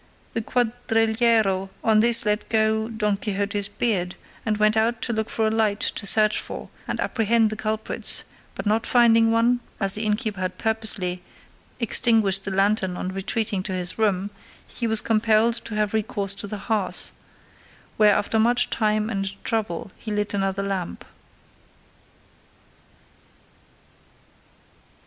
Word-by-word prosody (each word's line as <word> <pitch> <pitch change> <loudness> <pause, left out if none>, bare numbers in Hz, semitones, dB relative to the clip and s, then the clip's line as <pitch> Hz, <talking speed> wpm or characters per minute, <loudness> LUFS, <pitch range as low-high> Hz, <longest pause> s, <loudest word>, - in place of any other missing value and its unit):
The 230 - -1
cuadrillero 225 -4 +1
on 220 -1 +4
this 230 +1 +6
let 210 0 -1
go 220 0 +1
Don 210 -3 -1
Quixote's 200 -2 -2
beard, 195 -4 -1 0.3
and 215 -2 -1
went 215 +1 +3
out 225 +1 +1
to 235 - -1
look 220 0 -2
for 220 - -1
a 220 - +1
light 215 -2 +1
to 200 - -1
search 215 +1 +4
for - - -7 0.2
and - - -3
apprehend 225 -1 +1
the - - -3
culprits; 215 0 -2 0.3
but - - -6
not 215 +2 +1
finding 230 -2 +4
one, 230 +2 +2 0.2
as 195 -1 +2
the 210 - 0
innkeeper 210 -2 -1
had 185 0 -3
purposely 220 -5 0 0.6
extinguished 220 -4 +3
the - - -2
lantern 195 -1 0
on 185 - -4
retreating 195 +1 -2
to 190 0 -4
his 180 +3 -2
room, 200 -2 0 0.3
he 235 - -4
was 220 -1 +1
compelled 225 +1 +2
to 220 - -5
have 210 -1 -1
recourse 205 -2 0
to 200 +1 -5
the 210 - -5
hearth, 210 -5 0 0.9
where 210 -2 +5
after 220 +2 0
much 240 +2 +2
time 215 -1 0
and 195 -3 -3
trouble 210 -4 -3
he 220 - -9
lit 210 0 -2
another 195 0 -1
lamp. 195 -3 -4
215 Hz, 145 wpm, -23 LUFS, 200-225 Hz, 0.9 s, this